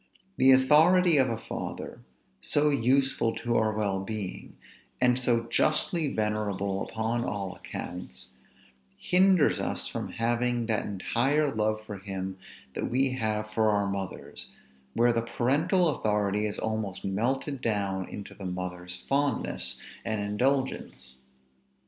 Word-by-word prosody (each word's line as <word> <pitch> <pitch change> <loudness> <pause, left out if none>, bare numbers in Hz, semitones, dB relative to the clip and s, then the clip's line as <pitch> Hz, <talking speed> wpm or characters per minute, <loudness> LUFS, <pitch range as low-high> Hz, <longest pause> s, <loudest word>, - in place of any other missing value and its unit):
The 130 +1 +6
authority 160 +6 +6
of 130 -2 +4
a 115 - -1
father, - - -6 0.4
so 145 - +2
useful 135 -2 +2
to 120 -1 -1
our 110 -1 +1
well 100 -2 0
being, 105 -2 -6 0.4
and 125 0 +3
so 120 -2 +2
justly 155 - +1
venerable 100 -2 -1
upon 115 +2 -1
all 100 -6 -3
accounts, 65 -8 -7 0.7
hinders 185 -3 +4
us - - -2
from - - -5
having 120 +1 0
that 110 -2 -1
entire 135 +9 +1
love 110 0 0
for 105 -3 -7
him 95 -1 -5 0.3
that - - -3
we 130 +2 +2
have 110 -3 -2
for 110 0 +2
our 105 -1 +2
mothers, 100 -1 -5 0.5
where 120 +1 +4
the 115 - +1
parental 150 - +2
authority 105 -5 0
is 105 - -5
almost 110 -3 -3
melted 125 +7 -1
down 100 -4 -1
into 100 - -8
the 95 - -7
mother's 90 0 -5
fondness 140 +9 -1 0.3
and 110 -1 -2
indulgence. 105 - -1
110 Hz, 130 wpm, -28 LUFS, 100-130 Hz, 0.7 s, The